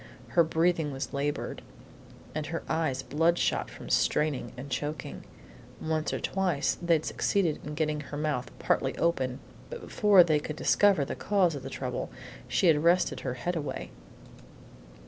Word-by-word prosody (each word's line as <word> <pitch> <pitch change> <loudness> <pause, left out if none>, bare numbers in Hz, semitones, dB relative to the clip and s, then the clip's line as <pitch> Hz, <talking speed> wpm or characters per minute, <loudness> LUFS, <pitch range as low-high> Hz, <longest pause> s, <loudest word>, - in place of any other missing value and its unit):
Her 170 - +5
breathing 165 -1 +1
was 135 +2 -5
labored, 145 +1 -2 0.7
and 155 -1 -3
her 165 +1 -4
eyes 135 -5 0
bloodshot 165 +4 +1
from - - -10
straining 145 -6 +1
and 135 +2 -8
choking. 145 +1 -4 0.6
Once 155 -1 -1
or - - -2
twice 180 -7 0
they 170 -2 +3
succeeded 175 -1 0
in 150 0 -6
getting 155 -1 0
her 145 0 -7
mouth 150 -4 -1
partly - - 0
open, 130 -7 0 0.3
but 485 - -6
before 205 -4 +5
they 155 -3 +2
could 150 0 -5
fairly - - -19
discover 195 -7 +4
the - - -4
cause 190 -5 +2
of 140 - -6
trouble - - -4 0.4
she - - +1
had 155 -3 +4
wrested 175 +2 +3
her 125 -2 -3
head 175 +9 -2
away. 150 -3 -4
155 Hz, 155 wpm, -29 LUFS, 145-170 Hz, 0.7 s, Her